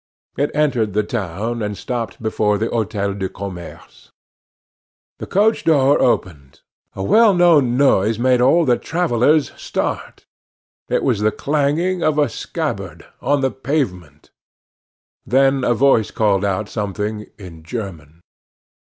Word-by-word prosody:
It 145 +2 0
entered 125 -9 +1
the 105 +1 +1
town, 110 +2 -4
and 105 -1 -3
stopped 115 -3 -5
before 105 -1 +1
the 110 +3 -2
Hotel 105 -3 -2
du 95 -1 -4
Commerce. 90 -3 -10 1.1
The - - -7
coach 215 +3 +2
door 145 -3 +3
opened; 75 - -1 0.3
a 95 - -4
well 215 - +5
known 155 -9 +4
noise 110 -6 +3
made 125 +1 +2
all 160 +7 +4
the 125 -3 +2
travellers 155 -3 +1
start; - - -4 0.6
it - - 0
was 120 -6 +1
the 105 +1 +2
clanging 155 +7 0
of 155 -2 +1
a 145 -3 +2
scabbard, - - -5 0.2
on 145 0 +1
the 135 -1 +1
pavement; 95 - -4 0.9
then 135 +2 +2
a 120 - +2
voice 120 -3 +3
called 100 -3 +1
out 100 +1 -1
something 105 0 -4
in 90 -6 -11
German. 85 -5 -8
115 Hz, 135 wpm, -19 LUFS, 100-140 Hz, 1.1 s, well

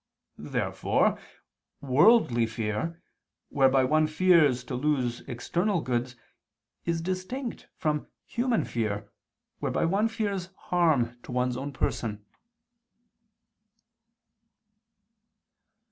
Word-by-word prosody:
Therefore - - 0 0.6
"worldly 135 - +4
fear," 110 +10 -3 0.5
whereby 135 -1 +4
one 155 +4 +3
fears 155 -6 +4
to - - -7
lose 125 -3 0
external 175 - -1
goods, 125 -1 -2 0.7
is 170 -1 0
distinct 190 +9 -4
from 150 -3 -1 0.2
"human 240 -1 0
fear," 105 -3 -3 0.5
whereby - - 0
one 200 +6 +2
fears 200 -5 -3
harm 140 -9 +1
to - - -10
one's 125 0 0
own 135 +3 -4
person. 105 -5 -2
145 Hz, 85 wpm, -28 LUFS, 125-180 Hz, 0.7 s, worldly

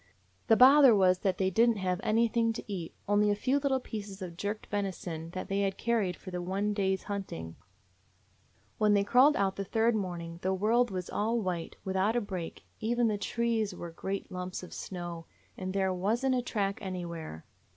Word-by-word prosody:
The 225 - +5
bother 265 -1 +8
was 185 -2 +4
that 190 -3 0
they 190 0 +1
did 230 +5 +4
n't 230 - +1
have 185 -2 -1
anything 230 +1 +2
to - - -6
eat; 185 -6 -6
only 205 +1 +3
a 205 - +2
few 260 +7 +1
little 270 -2 +1
pieces 205 -5 -7
of 180 -3 -6
jerked 205 +4 -4
venison 180 -5 -4
that 185 - -4
they 195 +1 0
had 195 -1 -1
carried 215 -6 0
for 185 - -10
the 180 0 -3
one 195 +4 -1
day's 190 -2 0
hunting. 135 - -5 1.2
"When 210 -1 +4
they 200 - +3
crawled 255 +8 +5
out 195 -1 0
the 200 - -2
third 225 +4 +2
morning 170 -4 -4
the 190 +1 0
world 230 +5 +2
was 185 -2 -4
all 225 +3 0
white, 180 -5 -3
without 190 +4 +1
a - - +3
break; 185 -5 -6 0.2
even 235 +1 +1
the 205 -1 -1
trees 225 -2 -1
were 170 -1 -7
great 195 +4 -5
lumps 180 0 -5
of 180 - -10
snow, 175 -3 -6 0.3
and 185 0 -4
there 190 -1 +1
was 210 +8 0
n't 265 - +3
a 250 - +1
track 200 -5 -2
anywhere. 170 - -6
200 Hz, 195 wpm, -30 LUFS, 185-225 Hz, 1.2 s, bother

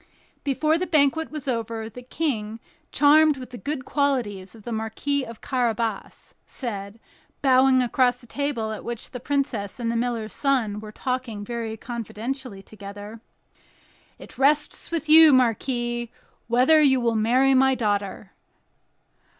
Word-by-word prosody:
Before 305 +3 +1
the 370 - -2
banquet 310 0 +2
was 305 -3 -7
over, 230 -2 -3
the 250 +3 -10
King, 235 -5 -3 0.3
charmed 300 +1 +5
with 255 -1 -9
the 245 - -7
good 285 -3 -4
qualities 235 -10 -1
of 220 - -15
the 240 - -6
Marquis 225 +6 -2
of 230 -3 -10
Carabas, 230 -5 -2
said, 205 -3 -6 0.4
bowing 260 -1 +5
across 245 0 +2
the 245 - -13
table 240 -4 -2
at 215 - -6
which 235 -1 -6
the 250 - -6
princess 255 -6 -2
and 230 -1 -1
the - - -3
miller's 230 -2 -2
son 245 -7 0
were 215 0 -9
talking 245 -3 -4
very 230 -1 -4
confidentially 235 -1 -6
together: 205 +2 -10 1.0
"It - - -13
rests 295 +2 +1
with 330 -2 -3
you, 315 -1 +9
marquis, 240 -1 0 0.4
whether 255 +7 +5
you 265 -3 +4
will 235 -1 +1
marry 250 +5 +3
my 265 0 +4
daughter." 205 -3 -2
245 Hz, 140 wpm, -24 LUFS, 220-275 Hz, 1.0 s, you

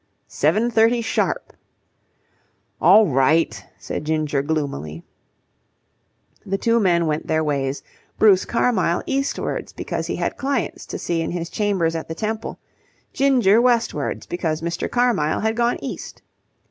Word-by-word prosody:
"Seven 235 +3 +1
thirty 230 +2 +4
sharp." 225 - -1 1.3
"All 220 0 +7
right," 150 +3 +2
said - - -5
Ginger 155 -2 0
gloomily. 140 - -3 1.4
The 195 +1 -2
two 230 +2 +2
men 175 -5 +2
went 155 -1 -2
their 160 0 +1
ways, 140 -2 -2 0.3
Bruce 200 -4 +5
Carmyle 205 -8 +1
eastwards 275 +1 -2
because - - -4
he - - -2
had - - -2
clients 270 - -2
to - - -5
see 170 -1 -2
in 165 - -2
his 170 -1 -4
chambers 190 -6 0
at 160 - -4
the 160 - -5
Temple; 220 +3 -4 0.6
Ginger 245 -6 +4
westwards 235 - 0
because 165 -2 -3
Mr. 170 0 -2
Carmyle 240 -11 +1
had 220 +1 0
gone 240 +1 +1
east. - - -7
180 Hz, 135 wpm, -21 LUFS, 155-230 Hz, 1.4 s, All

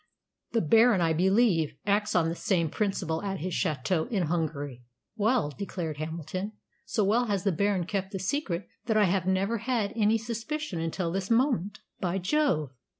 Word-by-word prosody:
"The 230 - +3
Baron, 225 +5 +5
I 165 -2 +2
believe, 185 -2 +3
acts 210 +1 +1
on 170 -2 +4
the 165 - -1
same 170 -3 0
principle 180 -6 -1
at 195 -1 -3
his 180 +1 -3
château 155 +4 0
in 200 -6 0
Hungary." 150 -6 -2 0.3
"Well," 220 - +2
declared 170 -3 -4
Hamilton, 165 +6 -4 0.3
"so 215 - +1
well 225 +5 +3
has 200 -5 -1
the 200 - +2
Baron 195 0 +1
kept 190 +1 -2
the 195 - -3
secret 190 - -2 0.2
that 220 -2 +2
I 215 - +5
have 185 -1 +1
never 195 +4 +1
had 230 -3 -1
any 220 0 +3
suspicion 230 - -4
until 165 +1 -2
this 190 +1 -2
moment. 230 - +1 0.2
By 180 0 -1
Jove! 185 - +1
190 Hz, 170 wpm, -28 LUFS, 165-215 Hz, 0.3 s, Baron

